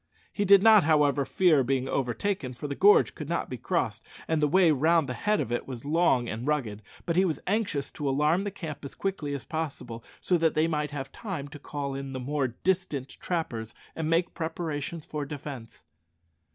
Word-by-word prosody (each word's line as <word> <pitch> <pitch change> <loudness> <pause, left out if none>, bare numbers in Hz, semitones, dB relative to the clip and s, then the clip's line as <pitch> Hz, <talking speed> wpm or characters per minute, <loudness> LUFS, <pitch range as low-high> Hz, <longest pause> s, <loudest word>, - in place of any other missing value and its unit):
He 205 - 0
did 200 0 +7
not, 220 -4 +8
however, 145 -2 +3
fear 160 -6 +4
being 130 +1 0
overtaken, 135 - -2
for 140 +5 -5
the 140 - -3
gorge 200 +8 +5
could 150 -1 -7
not 170 - -2
be 125 - -3
crossed, 115 - -1 0.2
and 160 -1 +1
the 150 - +4
way 180 +1 +5
round 160 +2 +3
the 125 - -3
head 210 +9 0
of 115 - -2
it 120 - -2
was 130 -1 -7
long 145 -6 +2
and 115 +5 -4
rugged; 120 -9 -1 0.2
but 170 - -1
he 185 - +5
was 170 -5 0
anxious 190 -9 -1
to 145 -2 -3
alarm 150 +6 +2
the 205 - -2
camp 165 -7 -7
as 140 - -8
quickly 160 -8 -2
as 140 - -6
possible, 145 -8 -5 0.2
so 180 -2 +1
that 160 -1 +2
they 155 +1 +3
might 150 -2 -1
have 135 -2 -6
time 180 -11 -5
to 145 - -10
call 140 -1 -4
in 135 0 -5
the 130 - -4
more 140 +1 -1
distant 150 0 -2
trappers 120 -11 -4 0.2
and 160 -1 -2
make 170 +2 +1
preparations 160 -1 -4
for 150 -1 -4
defence. 140 -5 -8
150 Hz, 205 wpm, -28 LUFS, 135-170 Hz, 0.2 s, not